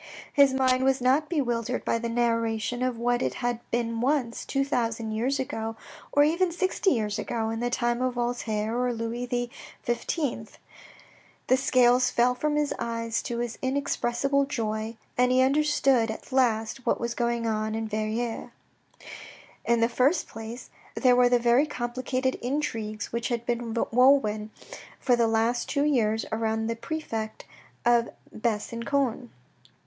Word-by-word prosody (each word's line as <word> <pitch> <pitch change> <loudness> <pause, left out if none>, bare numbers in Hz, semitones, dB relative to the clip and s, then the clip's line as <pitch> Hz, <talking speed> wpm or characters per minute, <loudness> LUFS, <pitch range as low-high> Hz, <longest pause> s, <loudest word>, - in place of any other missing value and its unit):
His 280 -2 +6
mind 260 -1 +2
was 270 0 +3
not 265 +5 +2
bewildered 250 -6 -1
by 230 - +1
the 235 0 -3
narration 230 0 0
of 255 -2 0
what 240 +1 +1
it - - -1
had 240 -1 -1
been 230 -1 -1
once, 255 -3 0
two 275 0 0
thousand 230 -4 -1
years 250 +6 0
ago, 225 -3 -3 0.4
or 290 - +5
even 340 +4 +2
sixty 375 +3 +1
years 215 - 0
ago, 225 -2 -2
in 225 - -3
the 245 +1 0
time 240 0 0
of 255 -1 0
Voltaire 240 -1 -1
and 240 -2 -2
Louis 240 +1 -3 0.4
XV. 240 -1 -2 0.9
The 255 - +4
scales 250 -1 +4
fell 245 +1 +3
from 295 +4 -1
his 295 -1 +1
eyes 230 -1 -2
to 235 - -4
his 235 -1 -3
inexpressible 275 0 0
joy, 220 -3 -3 0.2
and 250 0 +4
he 255 0 +5
understood 270 -4 +3
at 220 - -7
last 240 -1 +1
what - - +1
was 235 0 -2
going 235 -1 -1
on 215 -1 -1
in 225 0 -2
Verrieres. 220 +2 -2 1.2
In 235 -1 +2
the 230 - +5
first 260 +8 +2
place 225 +2 -8 0.2
there 255 -2 +4
were 245 0 +5
the 245 - +4
very 240 +5 +3
complicated 255 0 -2
intrigues 225 -6 -3
which 235 0 -1
had 235 -1 -2
been 235 -1 -2 0.2
woven 230 -4 +4 0.5
for 250 - +3
the 235 -1 +2
last 225 +2 +1
two 285 -2 +1
years 225 -6 +1
around 220 0 -1
the 230 +1 -1
prefect 230 -6 -5 0.4
of 235 -1 +4 0.3
Besancon. 235 +3 -1
240 Hz, 155 wpm, -27 LUFS, 230-260 Hz, 1.2 s, His